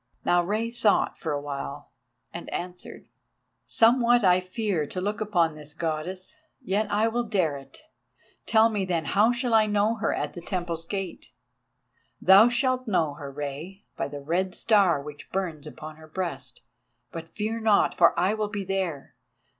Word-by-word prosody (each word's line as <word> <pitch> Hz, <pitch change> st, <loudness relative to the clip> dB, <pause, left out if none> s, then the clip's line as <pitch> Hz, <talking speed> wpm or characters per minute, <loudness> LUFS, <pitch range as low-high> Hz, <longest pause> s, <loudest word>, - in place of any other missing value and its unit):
Now 175 Hz, 0 st, +4 dB
Rei 215 Hz, +5 st, -1 dB
thought 230 Hz, -3 st, +1 dB
for 160 Hz, -, -3 dB
awhile 145 Hz, 0 st, -5 dB, 0.4 s
and 170 Hz, -, -7 dB
answered: 180 Hz, 0 st, -7 dB, 0.6 s
"Somewhat 240 Hz, 0 st, +4 dB
I 180 Hz, -1 st, +5 dB
fear 185 Hz, -4 st, -2 dB
to 185 Hz, -, -5 dB
look 205 Hz, +3 st, -2 dB
upon 175 Hz, -7 st, +1 dB
this 150 Hz, 0 st, -9 dB
Goddess, 170 Hz, -, -4 dB, 0.2 s
yet 210 Hz, -4 st, -1 dB
I 215 Hz, +2 st, +2 dB
will 240 Hz, +2 st, 0 dB
dare 185 Hz, -9 st, 0 dB
it. 135 Hz, -, -12 dB, 0.6 s
Tell 225 Hz, 0 st, +5 dB
me, 210 Hz, -3 st, -1 dB
then, 175 Hz, -3 st, -1 dB
how 215 Hz, +4 st, +3 dB
shall 245 Hz, -1 st, -1 dB
I 220 Hz, -1 st, +5 dB
know 210 Hz, +2 st, +1 dB
her 220 Hz, -, 0 dB
at -, -, -3 dB
the 175 Hz, -, -8 dB
temple's 170 Hz, -2 st, -3 dB
gate?" 195 Hz, 0 st, -5 dB, 0.9 s
"Thou 195 Hz, +5 st, +7 dB
shalt 255 Hz, +1 st, 0 dB
know 165 Hz, -8 st, +1 dB
her, 140 Hz, -1 st, -8 dB
Rei, 150 Hz, +8 st, -7 dB
by -, -, -2 dB
the 145 Hz, 0 st, -8 dB
red 180 Hz, +5 st, -1 dB
star 200 Hz, -8 st, +3 dB
which 145 Hz, 0 st, -10 dB
burns 165 Hz, -6 st, -3 dB
upon 155 Hz, 0 st, -9 dB
her 160 Hz, 0 st, -14 dB
breast. 155 Hz, -6 st, -5 dB, 0.5 s
But 165 Hz, 0 st, -8 dB
fear 220 Hz, +2 st, -3 dB
not, 220 Hz, -2 st, +3 dB
for 170 Hz, -, +4 dB
I 185 Hz, +4 st, +2 dB
will 215 Hz, -1 st, -2 dB
be 205 Hz, -1 st, -4 dB
there. 185 Hz, -7 st, -3 dB
185 Hz, 165 wpm, -26 LUFS, 160-215 Hz, 0.9 s, Thou